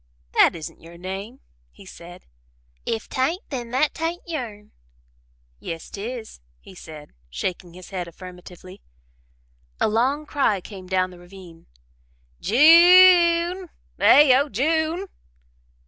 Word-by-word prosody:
"That - - +4
isn't 160 -2 -9
your 170 +1 -14
name," 195 +8 -8 0.3
he 195 - -18
said. 175 0 -13 0.6
"If 225 -1 -3
'tain't, 325 - -2
then 245 -4 -5
that 290 +6 -1
ain't 335 +2 -3
your'n?" 235 -11 -7 0.9
"Yes 165 - -8
'tis," 225 - -8 0.2
he - - -16
said, 155 -4 -12 0.2
shaking 175 - -6
his 185 +1 -13
head 180 -2 -5
affirmatively. 180 +1 -13 1.0
A - - +2
long 260 +8 0
cry 270 -9 0
came 185 0 -12
down 185 0 -1
the 180 - -15
ravine: 175 -2 -15 0.7
"J 340 - +6
u 345 - -4
n 370 -1 -9 0.3
e! - - -6
eh 275 -3 +6
oh 285 +1 -2
J 310 +9 0
u 315 - -4
n 350 - -5
e!" - - -7
220 Hz, 140 wpm, -22 LUFS, 180-300 Hz, 1.0 s, J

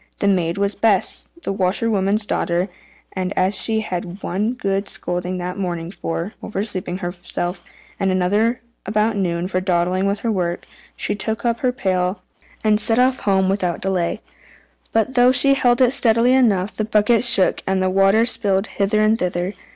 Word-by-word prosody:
The 200 - 0
maid 175 -3 +1
was 200 +1 0
Bess, 200 -2 +1
the - - -2
washerwoman's 200 +1 +1
daughter; 175 -1 -1 0.4
and 185 0 -3
as 185 +2 +2
she 220 -1 +1
had 180 -5 -3
had 180 +3 -10
one 210 +6 -1
good 195 -4 -2
scolding 180 +1 -3
that 180 +2 -5
morning 175 -3 -3
for 170 +1 -4
oversleeping 190 -3 -4
herself, 175 0 -4 0.4
and 195 - +1
another 205 +6 +1 0.3
about 215 +1 +1
noon 175 -3 -1
for 185 -1 -1
dawdling 185 +1 0
with 200 +1 -2
her 230 - -1
work, 175 -4 -2 0.3
she - - -1
took 220 +3 -2
up 235 -1 0
the 255 - +2
pail 185 -4 -1 0.4
and 215 -1 +3
set 225 +1 +3
off 255 +1 +3
home 190 -2 +1
without 185 -3 -1
delay. 185 -3 -1 0.7
But 225 +3 0
though 250 0 +5
she 275 +2 +5
held 245 -2 +2
it 245 - +4
steadily 235 0 +3
enough, 210 -7 +2
the 215 - -1
bucket 215 +2 +2
shook, 235 -6 +4
and 190 0 +1
the 185 - +1
water 195 +4 +4
spilled 205 -5 0
hither 215 0 0
and 215 +1 +2
thither. 180 +1 -2
195 Hz, 175 wpm, -20 LUFS, 180-220 Hz, 0.7 s, though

